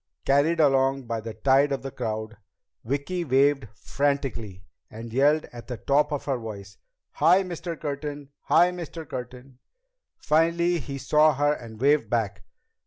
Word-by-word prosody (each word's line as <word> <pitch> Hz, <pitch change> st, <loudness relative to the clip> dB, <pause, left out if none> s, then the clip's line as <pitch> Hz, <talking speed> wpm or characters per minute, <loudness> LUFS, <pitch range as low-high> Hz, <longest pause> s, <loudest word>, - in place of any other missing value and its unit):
Carried 145 Hz, +5 st, +3 dB
along 135 Hz, -2 st, +3 dB
by 115 Hz, -2 st, -4 dB
the 110 Hz, 0 st, -7 dB
tide 135 Hz, +4 st, +3 dB
of 135 Hz, -, -2 dB
the 135 Hz, -, -5 dB
crowd, 110 Hz, -3 st, -4 dB, 0.5 s
Vicki 140 Hz, +9 st, -2 dB
waved 135 Hz, -2 st, +2 dB
frantically 130 Hz, -11 st, -2 dB, 0.3 s
and 115 Hz, +1 st, -9 dB
yelled 145 Hz, +4 st, +3 dB
at 120 Hz, -1 st, -10 dB
the 125 Hz, -, -5 dB
top 145 Hz, +4 st, +1 dB
of 145 Hz, -, -3 dB
her 135 Hz, -3 st, -1 dB
voice: 100 Hz, -4 st, -9 dB, 0.3 s
"Hi, 185 Hz, +4 st, +4 dB
Mr. 175 Hz, -2 st, -6 dB
Curtin! 145 Hz, -1 st, -5 dB, 0.2 s
Hi, 175 Hz, +2 st, +4 dB
Mr. 170 Hz, -3 st, -7 dB
Curtin!" 125 Hz, 0 st, -8 dB, 0.6 s
Finally 170 Hz, +2 st, +2 dB
he 140 Hz, 0 st, -6 dB
saw 150 Hz, +2 st, +3 dB
her 145 Hz, +2 st, +2 dB
and 115 Hz, -6 st, -10 dB
waved 140 Hz, -4 st, +2 dB
back. 110 Hz, -4 st, -1 dB
140 Hz, 150 wpm, -25 LUFS, 120-150 Hz, 0.6 s, Hi